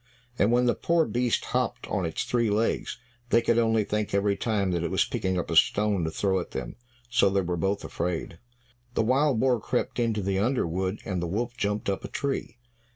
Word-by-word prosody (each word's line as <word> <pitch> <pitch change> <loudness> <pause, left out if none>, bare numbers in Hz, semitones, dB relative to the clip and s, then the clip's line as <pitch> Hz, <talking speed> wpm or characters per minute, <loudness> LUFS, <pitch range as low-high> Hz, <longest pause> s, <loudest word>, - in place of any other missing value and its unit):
And 105 - +4
when 125 +1 +3
the 120 - +3
poor 170 -1 +2
beast 120 -2 0
hopped - - -1
on 90 - -1
its 80 - -2
three 120 -2 +1
legs, 110 +3 0 0.3
they 115 - +5
could 115 0 +2
only 115 -1 +3
think 105 0 -2
every 100 0 +2
time 100 -3 0
that 85 -1 0
it 85 - -1
was - - +2
picking 95 -1 -2
up 90 - -3
a - - 0
stone 105 -4 +3
to - - -1
throw 95 +3 0
at 90 - -6
them. - - -5 0.4
So 125 -5 +4
they 100 0 +1
were 90 -1 -2
both 95 +4 -1
afraid; 85 -1 -3 0.6
the - - +2
wild 130 +1 +2
boar 125 -2 +3
crept - - -2
into 115 -4 0
the 95 0 0
under 125 +6 +1
wood 95 +4 -2
and 95 -5 -2
the 85 - -2
wolf 120 +7 -2
jumped 105 -2 -2
up 100 -1 -1
a - - -4
tree. 140 -3 -3
105 Hz, 220 wpm, -27 LUFS, 95-120 Hz, 0.6 s, they